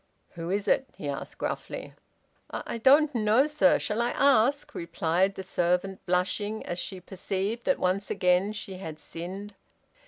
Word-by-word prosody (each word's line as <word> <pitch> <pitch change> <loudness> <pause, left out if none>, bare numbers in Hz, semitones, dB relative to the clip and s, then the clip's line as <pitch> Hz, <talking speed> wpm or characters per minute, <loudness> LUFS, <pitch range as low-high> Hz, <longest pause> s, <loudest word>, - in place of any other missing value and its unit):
"Who 170 -1 -6
is 200 +2 -1
it?" 265 -1 +2
he 145 - -5
asked 140 -1 -5
gruffly. - - -4 0.6
"I - - -5
I - - -4
don't 285 +5 +5
know, 225 +3 +4
sir. 300 -2 +4
Shall 215 +2 -1
I 240 - +1
ask?" 275 +1 +3
replied 170 +3 0
the 190 - -5
servant, 180 +1 0
blushing 185 +4 0
as 175 - -3
she 190 +1 -5
perceived 195 +5 -3
that 275 - +3
once 190 +2 0
again 180 +1 +2
she 195 -3 -6
had 160 -5 -6
sinned. 185 +6 -7
195 Hz, 160 wpm, -28 LUFS, 180-230 Hz, 0.6 s, don't